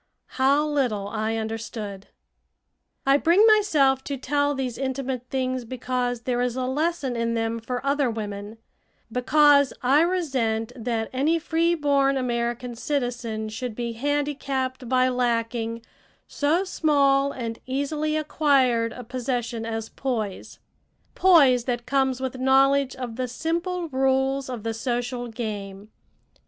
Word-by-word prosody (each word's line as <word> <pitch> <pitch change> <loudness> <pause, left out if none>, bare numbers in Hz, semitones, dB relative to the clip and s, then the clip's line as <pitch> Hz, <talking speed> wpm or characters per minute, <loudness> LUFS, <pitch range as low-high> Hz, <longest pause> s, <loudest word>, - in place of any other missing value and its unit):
How 280 +3 +4
little 250 -9 0
I 220 +1 -2
understood! 220 -3 -5 1.0
I 275 +1 +5
bring 345 +8 +4
myself 305 - +4
to 280 - -3
tell 285 +2 0
these 255 -3 -3
intimate 265 -2 -3
things 255 -1 -1
because 245 0 -2
there 245 0 -1
is 245 -1 -1
a 255 -1 -1
lesson 285 -1 -1
in 230 0 -1
them 225 0 -1
for 245 +3 -5
other 280 -2 +2
women 210 -1 -5 0.5
because 285 +3 +4
I 275 +5 +5
resent 260 -11 0
that 230 -2 -3
any 295 +6 +2
free 335 +1 +1
born 280 -3 +2
American 240 -1 -2
citizen 245 -4 -3
should 230 +1 -5
be 235 0 -3
handicapped 270 -1 -2
by 255 0 +3
lacking 230 -2 -1 0.4
so 310 +6 +1
small 280 -6 +2
and 230 -4 -5
easily 295 +3 -1
acquired 270 -7 +2
a 250 - -8
possession 240 -1 -3
as 225 -1 -4
poise, 220 -8 -4 0.6
poise 280 -10 +5
that 240 -2 -2
comes 265 -1 +1
with 260 -1 -4
knowledge 270 +1 +3
of 245 -3 -6
the 255 -1 -1
simple 340 +6 -2
rules 265 0 +1
of 240 -4 -5
the 225 0 -2
social 245 +1 -3
game. 210 -3 -6
255 Hz, 130 wpm, -25 LUFS, 230-280 Hz, 1.0 s, I